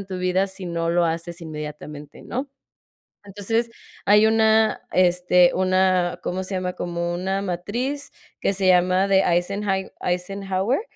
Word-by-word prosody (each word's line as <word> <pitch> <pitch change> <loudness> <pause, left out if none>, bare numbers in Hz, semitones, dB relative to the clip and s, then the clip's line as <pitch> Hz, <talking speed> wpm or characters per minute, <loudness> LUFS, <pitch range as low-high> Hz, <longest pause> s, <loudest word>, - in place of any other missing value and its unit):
en 195 - -14
tu 185 -1 -5
vida 185 +2 +1
si 190 -1 -8
no 170 -1 -1
lo 175 0 +2
haces 170 +1 -3
inmediatamente, 150 -2 -8
¿no? 270 +3 -4 0.8
Entonces, 225 +4 -2 0.3
hay 210 +2 +5
una, 220 0 +3
este, 180 -1 +4
una, 185 -1 +2
¿cómo 185 +1 -3
se 190 - -6
llama? 180 -1 -2
Como 170 0 -3
una 190 +2 -2
matriz, 235 +11 -3 0.3
que - - +1
se 190 -1 0
llama 185 +2 +4
de 195 -1 +5
Eisenhand 190 +2 0
Eisenhower, 195 - -1
185 Hz, 140 wpm, -23 LUFS, 175-200 Hz, 0.8 s, hay